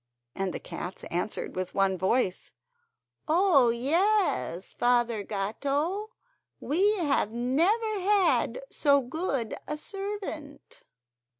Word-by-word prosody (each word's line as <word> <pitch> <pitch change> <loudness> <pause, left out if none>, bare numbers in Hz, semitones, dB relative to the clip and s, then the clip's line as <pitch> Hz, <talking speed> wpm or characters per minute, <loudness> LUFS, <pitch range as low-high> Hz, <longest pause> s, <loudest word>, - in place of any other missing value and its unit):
and 195 -1 -2
the - - -5
cats 180 +2 -7
answered 180 +5 -3
with 185 0 -4
one 195 -1 +2
voice: 190 +1 0 0.7
"Oh, 315 -6 +4
yes, 275 - +1
Father 240 -3 +2
Gatto, 280 - -2 0.5
we 390 +8 +2
have 290 - +1
never 350 - +1
had 405 +5 +2
so 280 -2 +3
good 265 - -2
a 300 - -3
servant!" 390 -6 -7
280 Hz, 100 wpm, -28 LUFS, -, 0.7 s, Oh